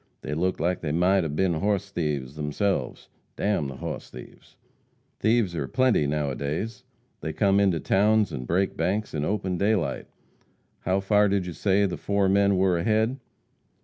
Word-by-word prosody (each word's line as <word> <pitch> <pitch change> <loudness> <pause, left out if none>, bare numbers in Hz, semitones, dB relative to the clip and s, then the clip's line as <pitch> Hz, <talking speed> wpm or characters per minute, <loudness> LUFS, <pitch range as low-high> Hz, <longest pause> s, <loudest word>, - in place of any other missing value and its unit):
They 75 - -4
looked 90 +4 -1
like 90 +3 0
they 75 - -2
might 90 +4 +3
'a 80 - -2
been 85 +4 +1
hoss 100 +3 -1
thieves 75 -6 -3
theirselves. 75 +7 -2 0.3
D - - -6
n 100 -8 +1
the 70 - -7
hoss - - -6
thieves!" 60 0 -13 0.6
"Thieves 110 -6 +2
are 70 -4 -2
plenty 130 - +2
now 75 -1 -1
a - - -4
days. 100 - -4 0.4
They 80 - -4
come 100 +4 +3
into 95 -5 +2
towns 105 +2 +2
and 65 -4 -5
break 95 +5 0
banks 105 +2 -1
in 75 -2 -2
open 95 -1 -1
daylight. 100 -4 0 0.7
How 95 +2 0
far 105 +1 +3
did 100 -2 0
you 90 - -5
say 100 +3 +2
the 95 - -3
four 100 -1 +1
men 100 0 +3
were 90 -2 +2
ahead?" 110 +8 +1
95 Hz, 180 wpm, -26 LUFS, 80-100 Hz, 0.7 s, might